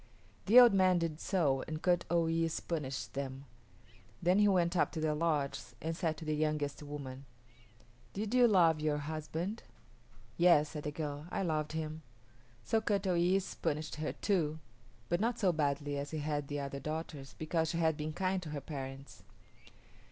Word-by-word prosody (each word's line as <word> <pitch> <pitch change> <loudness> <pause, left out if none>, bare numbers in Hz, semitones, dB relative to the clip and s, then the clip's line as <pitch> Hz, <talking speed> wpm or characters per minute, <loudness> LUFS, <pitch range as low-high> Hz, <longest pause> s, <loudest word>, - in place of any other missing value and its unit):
The 230 +5 +9
old 245 -4 +8
man 185 -2 +4
did 165 -2 -2
so 145 -9 +1
and 155 0 -4
Kut 175 +1 +2
o 170 -1 +3
yis´ 165 0 0
punished 140 -6 -3
them. 135 0 -5 0.7
Then 180 +3 +3
he 205 - +5
went 180 -3 +2
up 175 - +2
to 165 - -3
the 155 -1 +1
lodges 150 -3 -1
and 165 +1 -3
said 160 -2 -1
to 160 - -8
the 155 - 0
youngest 150 -2 -1
woman, 140 -2 -7 0.9
"Did 210 +3 -3
you 250 -1 +6
love 170 -7 +4
your 150 -1 +1
husband?" 160 +7 -4 0.8
"Yes," 170 -4 +5
said 150 -2 -7
the 150 - -1
girl, 145 0 -5
"I 195 - -2
loved 155 -3 -1
him." 155 0 -4 0.6
So 220 - +1
Kut 205 -2 0
o 185 - +2
yis´ 180 +3 +1
punished 155 +1 -2
her 155 0 -2
too, 160 -7 0 0.5
but 175 - +1
not 235 +2 +1
so 190 -4 +3
badly 145 -2 -1
as 140 +1 -4
he 160 - -4
had 145 -1 -2
the 145 0 -3
other 140 0 -4
daughters, 150 -4 -5
because 160 0 0
she 170 - -2
had 160 -2 +2
been 155 +1 -4
kind 185 +2 0
to 165 - -7
her 150 -1 -3
parents. 135 -1 -7
155 Hz, 180 wpm, -33 LUFS, 150-175 Hz, 0.9 s, The